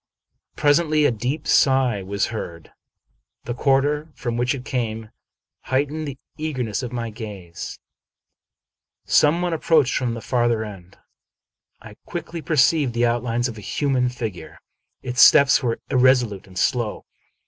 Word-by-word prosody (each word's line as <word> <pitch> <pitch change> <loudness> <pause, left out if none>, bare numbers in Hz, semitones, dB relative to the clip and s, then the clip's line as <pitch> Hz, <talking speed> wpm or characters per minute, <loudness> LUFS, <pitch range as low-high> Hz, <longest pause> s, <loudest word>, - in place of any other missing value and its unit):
Pres 145 +1 +4
ently, 155 -3 +2
a - - +1
deep 125 +7 -3
sigh 130 -6 +3
was 100 +2 -1
heard. 85 -6 -7 0.7
The 120 - -4
quarter 145 +4 +1
from 120 -2 -3
which 125 +3 0
it 130 -1 -9
came 110 -3 -3 0.5
heightened 145 +4 -1
the 140 -2 -6 0.2
eagerness 130 -8 -2
of 125 -2 -5
my 120 -2 -4
gaze. 100 -6 -8 1.3
Some 160 +4 +3
one 175 -1 -1
ap 160 - -3
proached 150 -6 +3
from 120 -3 -1
the - - -5
farther 120 -2 0
end. 95 -3 -11 0.9
I 105 -1 -12
quickly 170 -1 -6
perceived 150 -4 +2
the 120 0 +2
out 120 0 +1
lines 120 0 -1
of 115 -3 -8
a - - -10
human 130 +2 0
figure. 110 -10 -7 0.5
Its 125 0 0
steps 140 -2 +7
were 120 -3 -1
irresolute 125 -7 +2
and 95 -1 -13
slow. 120 +1 -1
125 Hz, 150 wpm, -22 LUFS, 110-145 Hz, 1.3 s, steps